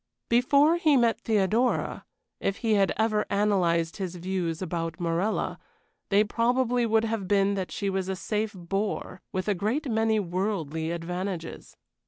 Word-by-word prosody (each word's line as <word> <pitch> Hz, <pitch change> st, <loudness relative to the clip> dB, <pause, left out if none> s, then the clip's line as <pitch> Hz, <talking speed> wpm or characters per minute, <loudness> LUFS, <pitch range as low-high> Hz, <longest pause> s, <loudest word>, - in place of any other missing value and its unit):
Before 280 Hz, +7 st, +4 dB
he 310 Hz, -5 st, +4 dB
met 235 Hz, -2 st, +2 dB
Theodora, 220 Hz, +3 st, +1 dB, 0.3 s
if 195 Hz, -, -1 dB
he 220 Hz, -, +3 dB
had 195 Hz, -2 st, +3 dB
ever 215 Hz, -1 st, +2 dB
analyzed 180 Hz, -5 st, +1 dB
his 185 Hz, -3 st, -4 dB
views 175 Hz, -2 st, -2 dB
about 165 Hz, -3 st, -3 dB
Morella, 175 Hz, +5 st, -1 dB, 0.5 s
they 205 Hz, +1 st, +5 dB
probably 240 Hz, +2 st, +1 dB
would 225 Hz, 0 st, +3 dB
have 220 Hz, -4 st, -2 dB
been 200 Hz, 0 st, +3 dB
that 190 Hz, -2 st, -3 dB
she 200 Hz, -, -3 dB
was 190 Hz, -1 st, -1 dB
a 190 Hz, -, -1 dB
safe 210 Hz, +4 st, -2 dB
bore 195 Hz, +2 st, -3 dB
with 185 Hz, +1 st, -3 dB
a 205 Hz, -, +3 dB
great 220 Hz, -, -1 dB
many 220 Hz, 0 st, +2 dB
worldly 175 Hz, -4 st, -2 dB
advantages. 175 Hz, +1 st, -5 dB
200 Hz, 150 wpm, -27 LUFS, 180-220 Hz, 0.5 s, they